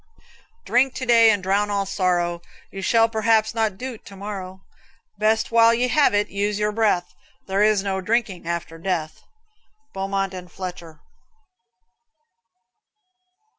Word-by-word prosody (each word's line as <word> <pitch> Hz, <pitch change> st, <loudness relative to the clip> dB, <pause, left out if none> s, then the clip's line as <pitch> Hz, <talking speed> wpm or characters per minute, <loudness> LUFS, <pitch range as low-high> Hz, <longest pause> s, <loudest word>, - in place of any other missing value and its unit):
Drink 260 Hz, +2 st, +2 dB
to 260 Hz, -, -4 dB
day 230 Hz, -2 st, +6 dB
and 205 Hz, -3 st, +1 dB
drown 200 Hz, +2 st, +1 dB
all 200 Hz, -1 st, -1 dB
sorrow; 175 Hz, -3 st, 0 dB, 0.3 s
You 195 Hz, -, -7 dB
shall 225 Hz, +3 st, +3 dB
perhaps 220 Hz, -1 st, +1 dB
not 220 Hz, -4 st, -1 dB
do't 250 Hz, -2 st, -7 dB
to 200 Hz, -, -12 dB
morrow; 190 Hz, -2 st, -7 dB, 0.6 s
Best 220 Hz, +1 st, +1 dB
while 230 Hz, 0 st, +5 dB
you 250 Hz, +2 st, 0 dB
have 290 Hz, -5 st, +3 dB
it, 205 Hz, 0 st, +1 dB
use 205 Hz, +1 st, -1 dB
your 210 Hz, 0 st, 0 dB
breath; 210 Hz, -5 st, 0 dB, 0.3 s
There 195 Hz, +1 st, 0 dB
is 210 Hz, -2 st, +3 dB
no 190 Hz, -1 st, -2 dB
drinking 210 Hz, -4 st, -1 dB
after 170 Hz, -1 st, -4 dB
death. 165 Hz, -3 st, -3 dB, 0.7 s
Beaumont 195 Hz, 0 st, -2 dB
and 180 Hz, -2 st, -9 dB
Fletcher. 170 Hz, -4 st, -8 dB
200 Hz, 135 wpm, -22 LUFS, 185-225 Hz, 0.7 s, day